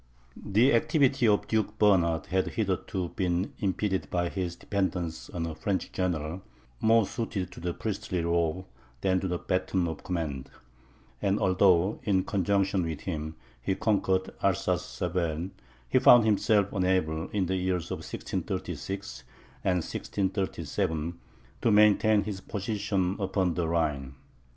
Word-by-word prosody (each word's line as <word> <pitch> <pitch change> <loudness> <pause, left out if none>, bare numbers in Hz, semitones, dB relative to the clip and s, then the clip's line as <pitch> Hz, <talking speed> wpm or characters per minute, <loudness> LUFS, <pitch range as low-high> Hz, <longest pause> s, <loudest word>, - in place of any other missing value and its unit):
The 110 +7 +4
activity 130 0 +3
of 105 -1 +2
Duke 110 -1 0
Bernard 85 -6 +3
had 95 0 0
hitherto 95 -4 -2
been 90 +1 -1
impeded 95 0 -1
by 85 -1 0
his 90 -2 -3
dependence 90 -4 -2
on 85 -2 -3
a 80 - -4
French 95 +4 -2
general, 85 -1 -2 0.4
more 115 -1 +4
suited 95 -5 -3
to - - -10
the 90 +1 -2
priestly 95 -5 -3
robe, 85 +1 0 0.4
than 95 -1 +2
to 95 - -2
the 90 -1 -1
baton 95 0 0
of 80 - -6
command; 75 -7 -3 0.7
and 100 0 +2
although, 95 +1 +3
in 95 -3 +1
conjunction 100 0 +1
with 80 -3 -4
him, 80 -3 -4 0.3
he 95 - 0
conquered 95 -3 +1
Alsace - - +1
Saverne, 85 0 -2 0.4
he - - +3
found 120 -2 +8
himself 105 -2 +2
unable, 90 -4 0
in 100 -3 0
the 95 +2 -1
years 90 -2 -1
1636 95 -9 -4 0.4
and 90 -3 +1
1637, 85 -5 -2 0.4
to - - +3
maintain 105 0 +5
his 100 -2 -5
position 100 -2 -1
upon 95 -2 0
the 85 -1 -1
Rhine. 75 -5 -1
95 Hz, 135 wpm, -28 LUFS, 85-100 Hz, 0.7 s, found